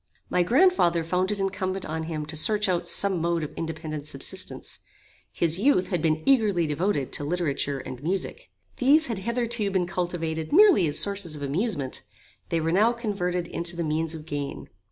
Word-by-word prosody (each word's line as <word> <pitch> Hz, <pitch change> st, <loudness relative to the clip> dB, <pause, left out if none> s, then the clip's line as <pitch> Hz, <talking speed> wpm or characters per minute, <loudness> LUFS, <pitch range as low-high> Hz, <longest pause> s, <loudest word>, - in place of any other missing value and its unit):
My 180 Hz, -, +3 dB
grand 295 Hz, -, +5 dB
father 170 Hz, -, +2 dB
found 180 Hz, +4 st, 0 dB
it 205 Hz, -, -2 dB
incumbent 190 Hz, -1 st, -2 dB
on 160 Hz, +1 st, -4 dB
him 155 Hz, -2 st, -4 dB
to 155 Hz, +2 st, -6 dB
search 210 Hz, +7 st, +3 dB
out 180 Hz, -2 st, 0 dB
some 195 Hz, -4 st, +2 dB
mode 170 Hz, -1 st, 0 dB
of 150 Hz, -, -6 dB
independent 160 Hz, -2 st, -5 dB
subsistence. 135 Hz, -2 st, -6 dB, 0.5 s
His 170 Hz, +1 st, +1 dB
youth 220 Hz, -5 st, +3 dB
had 180 Hz, -5 st, 0 dB
been 155 Hz, -1 st, +1 dB
eagerly 215 Hz, -10 st, +3 dB
devoted 150 Hz, -2 st, -1 dB
to -, -, -2 dB
literature 145 Hz, -3 st, -1 dB
and 130 Hz, -1 st, -8 dB
music. 185 Hz, +5 st, -3 dB, 0.3 s
These 290 Hz, +5 st, +5 dB
had 230 Hz, -8 st, -3 dB
hitherto 235 Hz, 0 st, -1 dB
been 190 Hz, -2 st, 0 dB
cultivated 170 Hz, -3 st, -3 dB
merely 365 Hz, -, +6 dB
as 150 Hz, 0 st, 0 dB
sources 200 Hz, -6 st, 0 dB
of 145 Hz, -, -7 dB
amusement. 145 Hz, -, -2 dB, 0.5 s
They 165 Hz, -, +1 dB
were 160 Hz, +1 st, 0 dB
now 215 Hz, +7 st, +4 dB
converted 180 Hz, -7 st, -2 dB
into 170 Hz, +1 st, -2 dB
the 170 Hz, -, -2 dB
means 160 Hz, +1 st, -1 dB
of 155 Hz, -1 st, -9 dB
gain. 145 Hz, -2 st, -5 dB
175 Hz, 180 wpm, -26 LUFS, 155-200 Hz, 0.5 s, merely